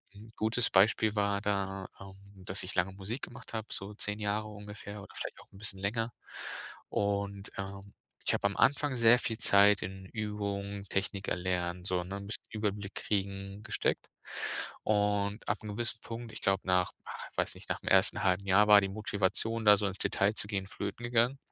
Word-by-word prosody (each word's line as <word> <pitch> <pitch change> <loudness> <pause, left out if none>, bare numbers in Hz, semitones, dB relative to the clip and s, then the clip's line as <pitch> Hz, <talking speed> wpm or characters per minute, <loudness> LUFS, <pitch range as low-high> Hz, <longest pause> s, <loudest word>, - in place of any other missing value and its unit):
N' 110 +2 -12
gutes 110 +2 +2
Beispiel 105 +2 +4
war 100 -1 +2
da, 100 -2 -1
ähm, 95 0 -11 0.3
dass 95 0 -3
ich 90 - -4
lange 90 +1 +1
Musik 100 +7 -5
gemacht - - -8
habe, 110 -1 -3
so 100 +2 -3
10 105 0 0
Jahre 105 +1 -1
ungefähr 105 0 -8
oder - - -13
vielleicht - - -5
auch - - -20
'n - - -13
bisschen 100 -2 0
länger 115 +4 -1 0.8
und, 100 0 -1
ähm, 100 0 -7 0.3
ich - - +2
habe - - -1
am 100 - +1
Anfang 145 -1 +3
sehr 115 +1 +6
viel 115 -3 -1
Zeit 100 -2 +6
in 95 0 -6
Übung, 100 -2 -4
Technik 95 0 -1
erlernen, 90 0 -1
so, 90 -2 0
ne, 100 +2 -5
bisschen 105 +3 -2
Überblick 105 -2 -3
kriegen, 100 0 -2
gesteckt. - - -1 0.8
Und 105 0 +1
ab 105 - 0
'nem 105 -1 -5
gewissen 120 0 +2
Punkt, 115 0 -7
ich - - -6
glaube, 95 0 +2
nach, 90 -1 +2
ah, - - -7 0.2
ich - - -23
weiß - - 0
nicht, - - -13
nach - - -1
dem - - -4
1. - - +5
1/2 95 +1 +2
Jahr 105 +3 +5
war 105 -1 +9
die 95 - 0
Motivation, 105 +2 0
da 105 - +9
so 100 0 +1
ins 95 - -3
Detail 100 +2 +2
zu - - +1
gehen, 100 -2 -3
flöten 100 +4 -5
gegangen. 120 +3 +3
100 Hz, 190 wpm, -31 LUFS, 95-110 Hz, 0.8 s, war